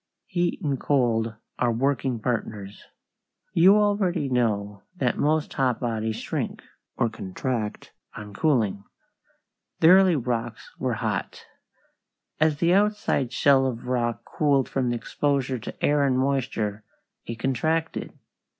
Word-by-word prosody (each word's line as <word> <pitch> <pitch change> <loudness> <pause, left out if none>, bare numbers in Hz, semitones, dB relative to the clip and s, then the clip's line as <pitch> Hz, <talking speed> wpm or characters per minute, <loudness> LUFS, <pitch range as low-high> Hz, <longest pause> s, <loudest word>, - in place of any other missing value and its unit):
Heat 175 0 -1
and 140 -4 -1
cold 115 -5 +1 0.2
are 120 -1 +2
working 130 0 0
partners. 105 -3 -4 0.7
You 185 +4 +6
already 195 -8 +1
know 105 -5 0
that 180 - -1
most 155 +1 +1
hot 130 -3 +1
bodies 110 -3 -2
shrink, - - -4 0.3
or 120 - +2
contract, 110 +1 -4 0.2
on 105 -1 -8
cooling. 110 -6 +1 1.0
The 160 - +6
early 185 -1 +6
rocks 120 -3 -3
were 125 -3 -1
hot. 105 -2 -3 0.9
As 155 -1 +3
the 170 +3 +3
outside 205 - +1
shell 135 -2 +4
of 120 -2 -5
rock 120 -2 -1
cooled 140 -3 +1
from 130 -3 -1
exposure 130 +1 -1
to 115 - -4
air 145 0 +3
and 130 -2 +2
moisture 130 -6 -1 0.4
it 115 - -4
contracted. 155 +7 -1
130 Hz, 125 wpm, -25 LUFS, 115-150 Hz, 1.0 s, You